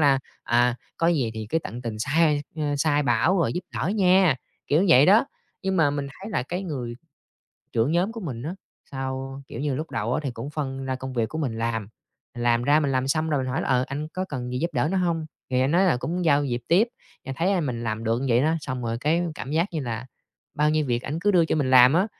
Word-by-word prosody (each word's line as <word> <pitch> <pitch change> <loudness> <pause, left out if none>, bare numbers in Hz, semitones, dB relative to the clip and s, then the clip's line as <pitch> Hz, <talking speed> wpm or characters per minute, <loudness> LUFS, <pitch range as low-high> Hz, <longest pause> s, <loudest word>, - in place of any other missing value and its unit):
là, 140 -3 +5 0.2
à, 120 0 +2 0.2
có 165 - +1
gì 145 -9 +2
thì 110 -1 -5
cứ 165 - +2
tận 125 -5 -7
tình 115 -2 -4
sai, 150 +4 +2
a, 150 -2 -1
sai 145 0 +2
bảo 135 +9 +2
rồi 170 - +1
giúp 180 - -2
đỡ - - -1
nha, 190 -5 +4 0.3
kiểu 150 - +3
như 195 - +2
vậy 140 -2 +7
đó. 210 +7 +6 0.4
Nhưng 190 -1 0
mà 160 -4 +4
mình 145 -1 -3
thấy 190 +9 -10
là 160 - 0
cái 175 +9 -4
người 130 -10 -4 0.8
trưởng 115 +7 +1
nhóm 180 +6 +1
của 230 - -7
mình 130 - -5
á, 160 +7 -4 0.4
sao, 135 0 -5
kiểu 115 - -6
như, 145 -1 -1
lúc 155 +5 -4
đầu 115 +2 -1
á, - - 0
thì 135 - -1
cũng 120 +4 -7
phân 135 -3 -4
ra 130 0 -2
công 130 0 -6
việc 115 -3 0
của 160 - -5
mình 125 -8 -2
làm, 115 -2 -2 0.5
mình 120 - -5
làm 120 0 +3
ra 145 +4 +4
mình 140 -3 0
làm 130 0 0
xong 155 +2 0
rồi 145 -3 +1
mình 130 - -3
hỏi 130 - -1
là, - - -3
ờ, 130 -1 +3
"Anh 145 +3 -4
có 185 +3 -3
cần 130 -8 -5
gì 125 - -1
giúp 170 +5 -1
đỡ 135 +2 +1
nữa - - +1
hông?" 170 -3 0 0.2
thì 125 -1 +2
anh 130 +2 +2
nói 180 +4 +4
là 180 -9 +3
cũng 175 +8 -3
giao 145 -3 +4
việc 125 -4 -1
tiếp. 200 +8 +4 0.4
Anh 135 0 -5
thấy, 175 +7 +1
a, 190 - +2
mình 125 -7 -3
làm 110 0 -3
được 115 +1 +1
như 135 - -2
vậy 120 0 +4
đó, 160 +3 +2
xong 130 -3 -4
rồi 115 0 -1
cái 160 +5 +2
cảm 135 - -6
giác 165 +5 +2
như 160 - -2
là 120 -1 -4 0.5
bao 150 +1 +2
nhiêu 155 -1 +1
việc 120 -1 0
ảnh 150 +3 -3
cứ 205 +3 +3
đưa 175 -4 +4
cho 160 - 0
mình 140 -4 0
làm 125 0 +8
á. 185 +4 +3
140 Hz, 270 wpm, -25 LUFS, 125-165 Hz, 0.8 s, làm